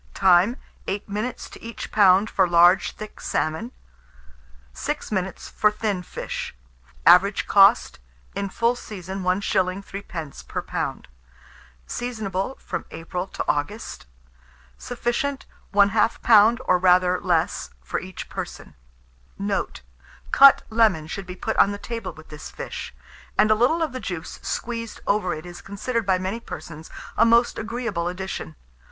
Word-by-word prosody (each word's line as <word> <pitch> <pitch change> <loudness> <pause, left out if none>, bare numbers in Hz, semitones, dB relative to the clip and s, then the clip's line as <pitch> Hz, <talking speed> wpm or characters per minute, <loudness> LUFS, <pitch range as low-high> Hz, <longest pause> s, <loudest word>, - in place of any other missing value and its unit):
Time. 190 +5 +4 0.3
8 200 +1 -3
minutes 215 +5 -4
to - - -12
each 230 0 -7
lb. 195 0 +5
for 190 -4 +2
large 175 +2 +5
thick 215 0 -9
salmon; 160 +10 -2 1.0
6 65 - -4
minutes 190 -2 -3
for 210 - +2
thin 210 -3 -2
fish. 180 - -6 0.5
Average - - +6
cost, - - +5 0.3
in 200 0 -3
full 230 +5 +1
season, 190 -4 -7
1s. 185 0 0
3d. 170 -7 -7
per - - -4
lb. - - -3 0.8
Seasonable 220 - -3
from - - -4
April 180 +3 -5
to - - -5
August. 150 - -3 0.7
Sufficient, 245 - -2 0.3
1/2 205 +2 +3
lb., 225 +1 +6
or 180 - +3
rather 180 0 +4
less, 175 0 0
for - - -2
each 185 -1 -8
person. - - -7 0.6
Note. 200 - -2 0.5
Cut 275 0 +8
lemon 215 -9 +3
should 190 +4 -6
be 180 - -6
put 220 +4 -3
on - - +6
the 205 - -4
table 230 -3 -5
with 160 0 -15
this 150 0 -9
fish; - - -7 0.5
and 215 +1 +5
a - - +8
little 250 +10 +2
of 315 - -2
the 255 - -5
juice 175 -8 -6
squeezed 230 -1 -4
over 200 -4 +1
it 155 +2 -9
is 175 0 -9
considered 220 +3 -3
by 190 -1 +4
many 190 +5 -3
persons 160 -6 -9 0.3
a - - +5
most 235 +1 +4
agreeable 225 -6 -3
addition. 180 - -5
195 Hz, 140 wpm, -24 LUFS, 180-225 Hz, 1.0 s, Cut